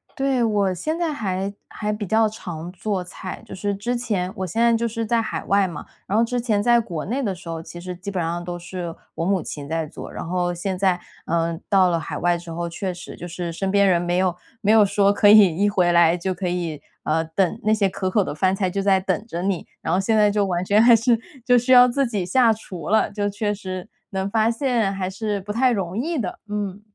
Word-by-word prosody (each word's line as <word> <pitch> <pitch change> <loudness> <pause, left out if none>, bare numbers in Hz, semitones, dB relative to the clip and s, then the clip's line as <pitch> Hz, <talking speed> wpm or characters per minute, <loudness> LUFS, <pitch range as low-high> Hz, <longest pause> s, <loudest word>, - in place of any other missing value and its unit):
对， 270 -3 +1
我 205 -4 +1
现 310 - -3
在 335 -3 -1
还 195 -5 -2
还 210 0 -3
比 210 0 -4
较 220 +3 +3
常 175 -5 -7
做 190 +1 -3
菜。 185 +3 -8
就 - - -10
是 200 +1 -2
之 235 +5 -2
前 205 -7 -2
我 190 0 -3
现 205 +7 -3
在 235 0 +5
就 235 +1 0
是 230 0 -3
在 230 +1 +2
海 225 - -4
外 200 -1 +3
嘛， 165 -5 -7 0.2
然 205 - 0
后 230 - +4
之 245 +1 -2
前 215 -4 +1
在 240 +2 +4
国 175 -9 -4
内 250 +8 -2
的 200 -7 -1
时 175 0 -14
候， 165 -1 -4
其 175 +1 -10
实 180 +1 -6
基 185 +3 -7
本 190 -3 -2
上， 170 +1 -2
都 175 0 -5
是 175 -1 -6 0.2
我 165 - -2
母 190 -2 +1
亲 145 -2 -7
在 160 +1 -1
做。 150 - -9
然 - - -6
后 175 0 0
现 185 +2 -3
在， 185 -1 +2 0.3
呃， 165 0 -1
到 190 -3 +5
了 170 -1 +1
海 - - -5
外 175 0 +2
之 170 0 -11
后， 170 +1 -3
确 185 +3 -3
实 175 - -9
就 175 - -8
是 175 0 -4
身 190 +4 -2
边 200 0 +4
人 175 -2 +3
没 175 0 0
有 185 -1 +1 0.3
没 210 -1 +3
有 220 -1 +7
说 200 0 +3
可 205 0 +5
以 205 -5 +7
一 205 +4 +2
回 180 -3 +2
来 170 0 +5
就 185 +2 -2
可 180 +1 -4
以， 170 -4 -3 0.2
嗯， 160 +1 0
等 195 +3 +1
那 215 - +2
些 210 -2 +3
可 190 0 -2
口 205 +2 +2
的 - - -4
饭 185 +5 +1
菜 190 -1 0
就 195 - -1
在 195 -1 +3
等 205 +3 -2
着 175 -5 -4
你， 190 -3 -1
然 - - -1
后 185 - +3
现 220 +3 +1
在 210 -1 +5
就 205 -1 +1
完 180 -1 -1
全 205 +3 +4
还 235 0 +8
是 230 +1 +2 0.3
就 245 -1 +5
需 245 +2 -1
要 250 -1 +9
自 270 +2 +1
己 205 -6 -2
下 235 +5 +4
厨 185 -7 -6
了， 220 +1 +3
就 205 0 -1
确 205 +1 -1
实 185 -2 -6 0.2
能 190 -1 -2
发 220 +2 +2
现， 235 -4 0
还 190 -1 -3
是 205 +2 -3
不 205 +2 -5
太 250 +3 +3
容 190 -5 -2
易 315 +9 -1
的， 210 -9 -3
嗯。 205 -1 -3
195 Hz, 270 characters per minute, -22 LUFS, 175-220 Hz, 0.3 s, 要